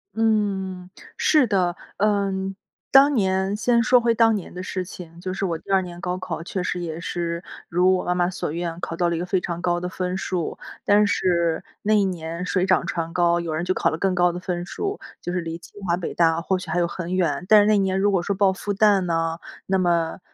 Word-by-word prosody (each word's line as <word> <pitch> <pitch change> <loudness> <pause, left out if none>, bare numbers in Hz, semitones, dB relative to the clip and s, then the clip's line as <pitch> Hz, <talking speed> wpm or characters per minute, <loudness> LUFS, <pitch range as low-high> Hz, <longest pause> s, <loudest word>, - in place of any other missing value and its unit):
嗯， 195 -5 0 0.3
是 300 -5 +3
的。 185 -4 +1 0.2
嗯， 195 -2 0 0.4
当 280 +1 +7
年 190 -3 +1
先 235 +2 +2
说 245 +1 +4
回 235 0 +3
当 225 -1 +4
年 195 - -6
的 180 - -6
事 185 0 -3
情， 170 -2 -11
就 185 0 -3
是 195 +1 -2
我 170 -3 -1
第 180 - -10
2 195 -1 +4
年 175 -1 -8
高 180 +1 -2
考 185 -3 -5
确 185 +2 -3
实 180 0 -2
也 160 -1 -4
是 170 0 -3 0.3
如 180 +2 +3
我 180 - -2
妈 180 - 0
妈 175 0 +1
所 185 -5 -4
愿 170 0 -3
考 165 - -4
到 175 - +2
了 170 - 0
一 - - -2
个 175 - -2
非 185 +1 +1
常 175 -1 -4
高 175 -1 +1
的 180 - -3
分 180 0 -3
数。 180 -3 -3 0.2
但 205 0 +4
是 170 -4 +1 0.2
那 215 - +2
一 210 -1 +4
年 170 -2 -3
水 185 0 +1
涨 185 0 +2
船 165 -1 -3
高 175 0 +3
有 170 -2 -3
人 160 +2 -2
就 185 +1 +1
考 - - +1
了 160 - -3
更 190 +1 +1
高 175 -1 +3
的 175 - -5
分 175 -1 -3
数， 405 - -4 0.2
就 175 - -4
是 180 - -1
离 165 -1 -5
清 175 +4 -15
华 170 - +3
北 175 -1 -5
大 165 -1 +2
或 185 +1 0
许 185 - -9
还 165 - -1
有 175 - +3
很 175 +1 -4
远， 175 -3 0
但 215 -1 +7
是 - - +3
那 215 -1 +4
年 190 -1 +1
如 200 +1 +2
果 185 - +2
说 195 +3 -2
报 195 -1 +4
复 205 +2 -3
旦 205 -1 +4
呢， 165 -2 -1 0.3
那 190 - +2
么， 170 -2 +1
180 Hz, 255 characters per minute, -23 LUFS, 170-195 Hz, 0.4 s, 当